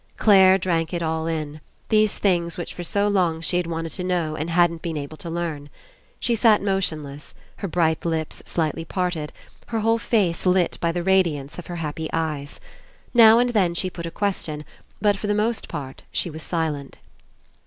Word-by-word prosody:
Clare 190 -3 +6
drank 170 -3 -1
it 170 - -2
all 160 0 -1
In, 155 -2 -4 0.3
these 215 -1 +3
things 170 -4 +1
which 175 - -5
for - - -7
so 200 +4 +1
long 180 -5 +1
she 170 +2 0
had 180 -1 -1
wanted 165 -1 -3
to 180 - -5
know 175 -4 -1
and 155 +2 -3
hadn't 170 -1 +2
been 165 -2 -3
able 145 +1 -6
to 170 - -7
learn. 165 -4 -4 0.5
She 240 - +1
sat 225 -2 +5
motionless, 155 -8 -2 0.2
her 200 - -4
bright 160 -2 +1
lips 160 -2 -2
slightly 165 -1 -1
parted, 175 -3 -2 0.4
her 225 -2 -2
whole 225 +1 +2
face 200 -8 +1
lit 180 -1 +2
by 170 - +2
the 175 +1 -3
radiance 170 -7 +1
of 180 - -9
her 175 - -5
happy 160 -1 -4
eyes. 150 -3 -3 0.5
Now 225 -2 +8
and 245 0 +3
then 185 -7 +2
she 185 +2 -1
put 170 -1 -6
a - - -3
question, 165 -6 -3 0.3
but 205 -1 +2
for 205 - -4
the 205 - +1
most 220 +2 0
part 135 -2 -6
she 175 - -2
was 160 +1 -8
silent. 155 -5 -3
170 Hz, 190 wpm, -23 LUFS, 160-190 Hz, 0.5 s, Now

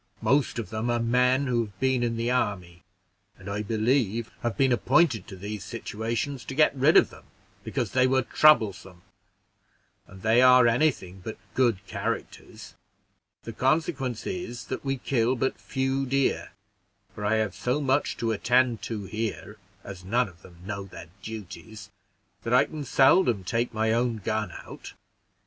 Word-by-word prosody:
Most 140 -2 +2
of 110 -5 -5
them 110 +2 -2
are 120 - +1
men 125 +3 +2
who 120 -3 0
have 100 -2 -17
been 130 -2 +1
in 115 -1 -1
the 115 +2 -1
army, 90 -8 -2 0.6
and - - -13
I 100 +1 -2
believe 115 +1 0
have 120 -2 -2
been 135 -1 +3
appointed 130 +1 +2
to 100 - -9
these 100 +1 -6
situations 115 +4 -4
to 135 - -6
get 150 -1 +4
rid 140 +4 +5
of - - +5
them - - -15 0.4
because - - -3
they 130 0 +3
were 130 0 +2
troublesome; 100 -12 +3 1.0
and 95 0 -14
they 115 +2 +4
are 125 -1 +7
any 125 +7 +4
thing 95 -8 -9
but 110 - -6 0.2
good 115 -7 +1
characters: - - -5 0.7
the 115 - -7
consequence 135 -2 -1
is, 175 -10 -5
that 130 - -5
we 135 -1 -1
kill 125 -1 0
but 130 +2 -2
few 135 0 -1
deer, 135 +1 0 0.6
for 105 - -8
I 105 +2 +2
have 110 -4 0
so 125 +8 -1
much 140 0 0
to 115 -1 -1
attend 120 +1 +2
to 110 -3 -4
here, 110 +1 -5 0.3
as 95 -3 -9
none 120 +6 +1
of 85 -2 -16
them 85 -2 -16
know 100 -1 -5
their 85 -3 -11
duties, 105 0 -9 0.5
that 115 +3 0
I - - +5
can 155 -2 -7
seldom 130 - +4
take 115 +6 -1
my 110 0 0
own 120 -1 0
gun 105 -1 -2
out. - - -11
115 Hz, 165 wpm, -26 LUFS, 105-130 Hz, 1.0 s, are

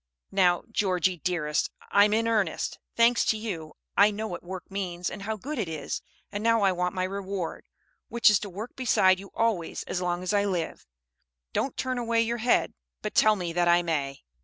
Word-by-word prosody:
"Now, 180 -3 +3
Georgie, 185 -4 +1
dearest, 155 -3 0 0.2
I'm 205 +1 +5
in 225 +1 +2
earnest. 210 -7 0 0.2
Thanks 235 +1 +4
to 220 - +2
you, 175 -8 -5 0.2
I 205 +1 +6
know 215 +1 -4
what 175 - -6
work 185 +1 -8
means 180 -3 -3
and 195 - -7
how 220 +2 -3
good 275 +6 -5
it 195 -7 -2
is. 155 -2 -4 0.3
And 205 +1 -4
now 230 -2 +3
I 195 - +5
want 180 +1 -1
my 185 - 0
reward, 190 -2 -4 0.4
which 235 0 +3
is 210 -2 +7
to 205 - -6
work 210 +6 -7
beside 190 -7 +3
you 195 0 -10
always 220 -8 0
as 180 - -3
long 175 0 -1
as 185 - -1
I 200 0 +3
live. 180 -5 -3 0.7
Don't 270 - -1
turn 255 -1 -1
away 230 -1 +1
your 235 +1 -1
head, 240 +2 +2 0.3
but - - -3
tell 215 0 +5
me 175 -4 -4
that 175 0 +2
I 175 0 +5
may." 140 -5 -2
195 Hz, 200 wpm, -27 LUFS, 175-220 Hz, 0.7 s, is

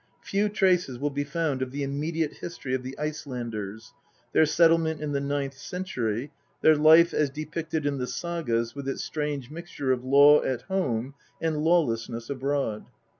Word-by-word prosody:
Few 205 +1 0
traces 185 - +2
will 145 +3 -1
be 145 +1 -1
found 145 -2 -2
of 130 - -1
the 140 +1 -3
immediate 150 +3 -2
history 170 -7 -6
of 130 - 0
the 130 +1 -7
Icelanders, 120 -9 -5 0.4
their 160 - +5
settlement 165 0 +3
in 150 -1 -3
the 140 - 0
ninth 140 -1 -2
century, 135 - -3 0.3
their 155 - +6
life 160 +3 +6
as 150 -2 +2
depicted 155 +1 -4
in 140 -1 0
the 125 - -2
sagas 125 -5 -2
with 140 -1 -5
its - - -3
strange 150 -4 -3
mixture 160 -5 -3
of 125 -1 0
law 140 +3 +7
at 125 -2 -2
home 135 - -1 0.3
and 155 -2 -1
lawlessness 120 -8 +1
abroad. 135 -5 -2
145 Hz, 165 wpm, -27 LUFS, 130-160 Hz, 0.4 s, law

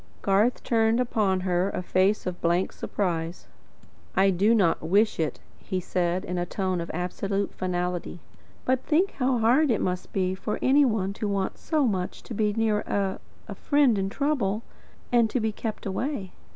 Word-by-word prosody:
Garth 205 +5 +2
turned 225 0 +2
upon 210 -6 +1
her 180 +1 +1
a 180 - -4
face 190 +4 +2
of 180 -1 -4
blank 175 +2 +1
surprise. 170 -3 -3 0.7
"I 195 0 +4
do 200 +6 +3
not 180 -7 +2
wish 200 +7 +2
it," 155 -5 -1 0.2
he 190 -2 -3
said, 180 +1 -1
in 180 -1 -3
a 175 - -1
tone 185 -2 -1
of 170 - -6
absolute 195 +3 -2
finality. 180 -1 -3 0.5
"But 260 0 +1
think 345 +5 +2
how 255 -1 +2
hard 250 +7 +4
it 225 - +2
must 180 0 -2
be 185 -1 0
for 195 +2 -3
any 280 +2 +4
one 205 -5 0
to 210 - -3
want 195 -1 -2
so 310 -3 +1
much 185 -6 -2
to - - -8
be 210 -1 +1
near 215 -1 +1
a 195 -2 -2 0.3
a - - -5
friend 285 -5 +3
in 195 -1 -1
trouble, 235 -5 0 0.5
and 235 -2 +4
to 250 - 0
be 220 -1 0
kept 215 0 -5
away." 200 0 -3
200 Hz, 180 wpm, -26 LUFS, 185-230 Hz, 0.7 s, I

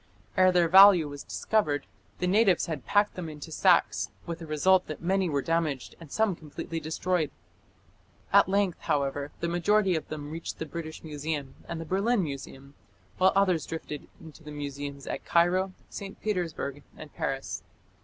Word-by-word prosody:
Ere 185 0 +5
their 175 -2 +4
value 190 -2 +8
was 145 -1 -7
discovered, 150 -10 0 0.3
the - - -1
natives 195 -1 +4
had 155 -8 -5
packed 205 0 +3
them 175 -3 -5
into 155 +1 -9
sacks, 180 +2 +3 0.2
with 170 -1 -5
the 165 - -8
result 180 +5 +3
that 155 - -6
many 190 0 +1
were 140 -3 0
damaged 160 -6 -1
and 165 -4 -12
some 220 -4 +1
completely 165 +1 -6
destroyed. 160 0 -1 1.0
At - - +6
length, 195 -2 +1
however, 140 0 -1
the 170 - 0
majority 185 +2 +2
of 160 - -3
them 150 -1 -6
reached 165 +1 -5
the 160 - -4
British 160 +1 -7
Museum 150 -3 -4
and 170 - -4
the 165 - -5
Berlin 200 +5 +1
Museum, 140 -2 -7 0.5
while 190 +1 +6
others 185 -5 +2
drifted 150 -2 -6
into 160 0 -13
the 150 - -9
museums 140 -1 -6
at - - -4
Cairo, 180 +3 +2 0.2
St. 195 -1 -7
Petersburg, 170 -8 -3 0.2
and 155 -2 -11
Paris. 135 0 -3
165 Hz, 165 wpm, -28 LUFS, 150-185 Hz, 1.0 s, value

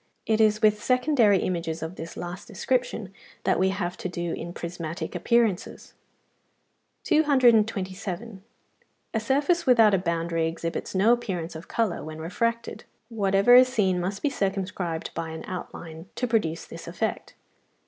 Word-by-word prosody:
It 220 0 +2
is 215 0 +3
with 210 -1 +4
secondary 250 -5 +4
images 165 -2 -2
of 160 +2 -5
this 165 -1 -8
last 175 +4 -6
description 235 -2 -2 0.3
that - - +2
we 190 +1 +3
have 185 -2 -2
to 185 - -4
do 175 -1 -3
in 170 - -5
prismatic 170 -1 -5
appearances. 210 +2 0 1.1
227. 220 - +2 0.7
A 225 - +1
surface 285 +8 +1
without 225 -5 +6
a 195 - +4
boundary 165 -2 -1
exhibits 165 +3 -4
no 210 +5 +5
appearance 180 -9 -3
of 160 +3 -9
colour 225 -6 -1
when 155 +1 -7
refracted 230 +8 -2 0.3
(195). 230 - -12
Whatever 200 +2 +4
is 255 +1 +9
seen 190 -7 +1
must 190 +3 -3
be 290 - +3
circumscribed 190 -6 -2
by 165 -1 -4
an 160 0 -7
outline 170 -2 -8
to 250 - -1
produce 210 -9 0
this 165 - -10
effect. 185 +6 -3
195 Hz, 150 wpm, -26 LUFS, 170-230 Hz, 1.1 s, is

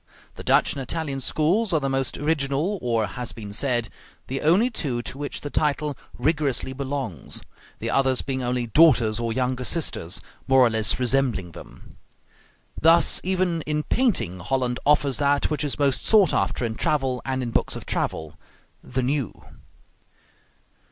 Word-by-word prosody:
The - - -10
Dutch - - +3
and 140 - -5
Italian 140 +1 -3
schools 180 - +2
are 160 - +3
the 135 - -2
most 135 -1 -1
original, 150 +5 -1
or, 115 -3 0
as 95 - -8
has 125 +4 -4
been 105 -3 -8
said, 120 -1 0 0.4
the 135 +1 -4
only 195 +11 +3
two 125 - -3
to 135 - -5
which 145 - -4
the 145 - -6
title 150 -1 0 0.2
rigorously 140 -2 0
belongs; 130 - -4 0.3
the - - -3
others 130 -2 +2
being 130 -1 -3
only 125 0 -1
daughters 120 -4 +4
or 115 -1 -2
younger 125 +1 -1
sisters, 120 - +1 0.3
more 135 -1 +5
or 115 - +2
less 110 +1 +1
resembling 125 -8 +1
them. - - -13 0.9
Thus 165 +1 +5
even 185 -2 0
in 150 0 -1
painting 120 - 0
Holland 125 +5 -1
offers 145 -3 +3
that 145 +1 +1
which 150 - -1
is 145 - -1
most 140 -2 +1
sought 205 -7 +4
after 95 +5 0
in 115 - -2
travel 130 0 -1
and 130 -1 -2
in 120 - -4
books - - 0
of - - -8
travel: 80 -2 -3 0.4
the 130 0 -3
new. 135 -3 -2
135 Hz, 165 wpm, -24 LUFS, 120-150 Hz, 0.9 s, more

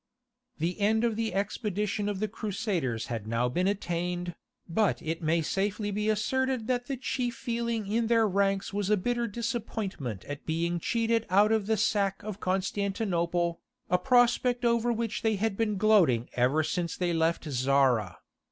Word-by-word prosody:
The 170 +5 -2
end 220 +2 +2
of 230 -2 +1
the 225 0 -1
expedition 205 +1 -1
of 200 -2 -3
the 215 - 0
Crusaders 190 - -2
had 115 -3 -5
now 115 +2 +1
been 180 +10 0
attained, 175 -2 -2 0.3
but 200 +4 +1
it 160 +2 -4
may 165 +1 +1
safely 205 +4 -1
be 210 +2 -1
asserted 245 +3 0
that 245 0 -1
the 275 - -3
chief 245 -1 -2
feeling 235 -2 -2
in 225 +3 0
their 230 -1 +4
ranks 195 0 0
was 205 -1 -1
a 210 - +4
bitter 240 +4 -1
disappointment 210 - -4
at 145 0 -6
being 170 +2 0
cheated 230 +4 0
out 205 +3 +4
of 220 -3 +1
the 220 0 +2
sack 200 -2 +1
of 205 -1 -6
Constantinople, 185 -3 -1 0.3
a 180 - +4
prospect 245 +2 +3
over 235 0 +2
which 230 -2 -2
they 220 -1 +2
had 210 0 -1
been 210 -1 0
gloating 185 - +4
ever 130 +6 +2
since 170 +1 -2
they 175 -2 0
left 165 0 +1
Zara. 130 -6 +2
200 Hz, 165 wpm, -29 LUFS, 170-225 Hz, 0.3 s, their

